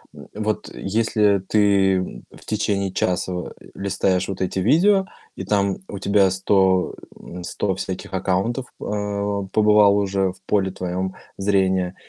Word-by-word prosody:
н 105 Hz, -, -8 dB
вот 105 Hz, 0 st, -2 dB
если 105 Hz, -1 st, +1 dB
ты, 100 Hz, -2 st, +3 dB
м, 90 Hz, 0 st, -4 dB
в -, -, -16 dB
течение 100 Hz, -3 st, -1 dB
часа, 90 Hz, 0 st, 0 dB
а, 90 Hz, -1 st, -5 dB, 0.2 s
листаешь 95 Hz, -1 st, 0 dB
вот 95 Hz, -1 st, -5 dB
эти 95 Hz, 0 st, -1 dB
видео, 190 Hz, -, +4 dB, 0.3 s
и -, -, -6 dB
там 100 Hz, 0 st, +1 dB
у 100 Hz, -, -6 dB
тебя 100 Hz, 0 st, +3 dB
100, 95 Hz, 0 st, +2 dB, 0.3 s
м, 90 Hz, 0 st, -9 dB
100 95 Hz, +2 st, -2 dB
всяких 95 Hz, +1 st, -6 dB
аккаунтов, 95 Hz, +7 st, -1 dB
а, 100 Hz, -1 st, -2 dB
побывало 105 Hz, -1 st, +5 dB
уже 95 Hz, -1 st, 0 dB
в -, -, -16 dB
поле 100 Hz, -2 st, +1 dB
твоем 90 Hz, +1 st, -3 dB, 0.2 s
зрения, 95 Hz, -2 st, +1 dB
100 Hz, 145 wpm, -22 LUFS, 95-105 Hz, 0.3 s, побывало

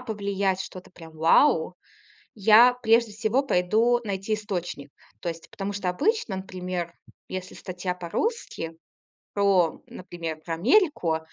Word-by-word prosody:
повлиять, 200 Hz, -5 st, -1 dB
что-то 185 Hz, -1 st, -8 dB
прям 165 Hz, -3 st, -13 dB
вау! 165 Hz, -, +4 dB, 0.6 s
Я 225 Hz, +4 st, +7 dB
прежде 230 Hz, 0 st, +3 dB
всего 220 Hz, +6 st, 0 dB
пойду 225 Hz, +3 st, +2 dB
найти 200 Hz, +1 st, -2 dB
источник, 180 Hz, -9 st, -4 dB, 0.3 s
то 175 Hz, -, -2 dB
есть, 165 Hz, 0 st, -8 dB
потому 195 Hz, +1 st, -4 dB
что 195 Hz, -2 st, -2 dB
обычно, 220 Hz, -, 0 dB
например, 180 Hz, -2 st, -5 dB, 0.4 s
если 185 Hz, 0 st, -6 dB
статья 180 Hz, 0 st, -4 dB
по-русски 175 Hz, -, -3 dB, 0.6 s
про, 195 Hz, -5 st, +2 dB
например, 170 Hz, -3 st, -7 dB
про 165 Hz, -, -3 dB
Америку, 205 Hz, -, +2 dB
190 Hz, 120 wpm, -26 LUFS, 175-220 Hz, 0.6 s, Я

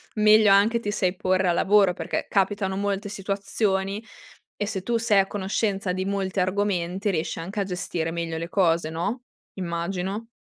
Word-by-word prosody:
meglio 215 Hz, 0 st, +6 dB
anche 210 Hz, +4 st, +4 dB
ti 205 Hz, -3 st, -3 dB
sai 185 Hz, -3 st, 0 dB
porre 185 Hz, -1 st, +1 dB
al 170 Hz, -, +2 dB
lavoro, 195 Hz, -2 st, +4 dB
perché -, -, -3 dB
capitano 195 Hz, -1 st, 0 dB
molte 200 Hz, 0 st, -2 dB
situazioni 195 Hz, 0 st, -1 dB, 0.5 s
e 205 Hz, -, -2 dB
se 195 Hz, -3 st, -3 dB
tu 235 Hz, +4 st, 0 dB
sei 225 Hz, -3 st, +3 dB
a 195 Hz, -, +3 dB
conoscenza 195 Hz, -1 st, -1 dB
di 185 Hz, +1 st, -2 dB
molti 195 Hz, -1 st, -1 dB
argomenti 185 Hz, 0 st, 0 dB
riesci 165 Hz, -3 st, -2 dB
anche 190 Hz, +6 st, -5 dB
a -, -, +2 dB
gestire 175 Hz, -3 st, -3 dB
meglio 165 Hz, -1 st, -3 dB
le 165 Hz, -, -4 dB
cose, 170 Hz, -4 st, +2 dB
no, 175 Hz, +10 st, -3 dB, 0.3 s
immagino. 185 Hz, +4 st, -3 dB
195 Hz, 165 wpm, -25 LUFS, 180-205 Hz, 0.5 s, meglio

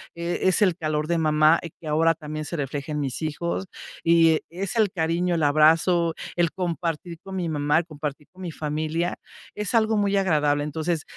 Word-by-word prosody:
e 170 Hz, +1 st, -3 dB
es 185 Hz, +3 st, +4 dB
el 185 Hz, -4 st, +3 dB
calor 155 Hz, -3 st, -1 dB
de 170 Hz, 0 st, +1 dB
mamá, 155 Hz, +1 st, +4 dB
eh, 170 Hz, -, -7 dB
que 165 Hz, -, -14 dB
ahora 165 Hz, +2 st, +3 dB
también 155 Hz, 0 st, -6 dB
se 160 Hz, -, -5 dB
refleja 145 Hz, +1 st, -4 dB
en 150 Hz, -, -1 dB
mis 135 Hz, 0 st, -3 dB
hijos, 170 Hz, +4 st, -2 dB, 0.4 s
y 165 Hz, -1 st, +5 dB
e -, -, -8 dB
es 190 Hz, +5 st, -4 dB
el 215 Hz, -4 st, +3 dB
cariño, 170 Hz, 0 st, 0 dB
el 160 Hz, -, 0 dB
abrazo, 160 Hz, +3 st, +4 dB, 0.2 s
el 170 Hz, -2 st, +2 dB
compartir 170 Hz, -2 st, -3 dB
con 195 Hz, 0 st, -7 dB
mi 180 Hz, -2 st, -2 dB
mamá, 150 Hz, -1 st, +1 dB
el 165 Hz, -, +1 dB
compartir 150 Hz, -2 st, -6 dB
con 185 Hz, -, -15 dB
mi 180 Hz, -, -4 dB
familia. 155 Hz, +3 st, -2 dB, 0.4 s
Es 210 Hz, +2 st, -2 dB
algo 220 Hz, -1 st, +3 dB
muy 200 Hz, -1 st, +2 dB
agradable. 150 Hz, -6 st, +2 dB
Entonces, 155 Hz, +2 st, -2 dB
165 Hz, 200 wpm, -24 LUFS, 150-175 Hz, 0.4 s, y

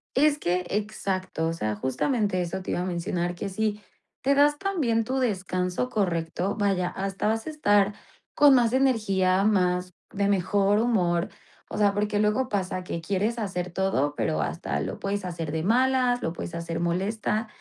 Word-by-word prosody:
Es 295 Hz, +2 st, +3 dB
que, 180 Hz, -3 st, 0 dB
exacto, 190 Hz, -5 st, -2 dB
o 165 Hz, -, -1 dB
sea, 110 Hz, -10 st, -2 dB
justamente 185 Hz, -, 0 dB
eso 185 Hz, +2 st, -3 dB
te -, -, -4 dB
iba -, -, -1 dB
a 180 Hz, -, -2 dB
mencionar, 175 Hz, 0 st, -2 dB
que 200 Hz, -, -4 dB
si 210 Hz, +2 st, -1 dB, 0.4 s
te 275 Hz, -, +4 dB
das 290 Hz, +1 st, +4 dB
también 295 Hz, -13 st, 0 dB
tu 260 Hz, +4 st, -2 dB
descanso 190 Hz, -1 st, -1 dB
correcto, 180 Hz, -2 st, -1 dB
vaya, 195 Hz, -4 st, +1 dB
hasta 195 Hz, +2 st, -3 dB
vas 225 Hz, +1 st, 0 dB
a -, -, -4 dB
estar 205 Hz, -9 st, +3 dB, 0.4 s
con 290 Hz, -2 st, +6 dB
más 240 Hz, -1 st, +3 dB
energía, 195 Hz, -8 st, +2 dB
más 180 Hz, -3 st, +1 dB, 0.2 s
de 200 Hz, 0 st, 0 dB
mejor 200 Hz, +1 st, +2 dB
humor. 180 Hz, -7 st, +1 dB, 0.4 s
O -, -, -5 dB
sea, 205 Hz, -1 st, +3 dB
porque 205 Hz, +1 st, 0 dB
luego 215 Hz, +5 st, +1 dB
pasa 185 Hz, -2 st, -2 dB
que 170 Hz, -2 st, -4 dB
quieres 200 Hz, +7 st, -1 dB
hacer 180 Hz, -4 st, -3 dB
todo, 145 Hz, -6 st, 0 dB
pero, 105 Hz, -, 0 dB
hasta 75 Hz, 0 st, -2 dB
lo -, -, -4 dB
puedes 200 Hz, 0 st, -2 dB
hacer 165 Hz, -4 st, -4 dB
de 160 Hz, 0 st, -1 dB
malas, 250 Hz, +3 st, +2 dB
lo 165 Hz, -, -1 dB
puedes 170 Hz, -, -6 dB
hacer 170 Hz, 0 st, -4 dB
molesta. 205 Hz, +5 st, -1 dB
195 Hz, 175 wpm, -26 LUFS, 180-225 Hz, 0.4 s, con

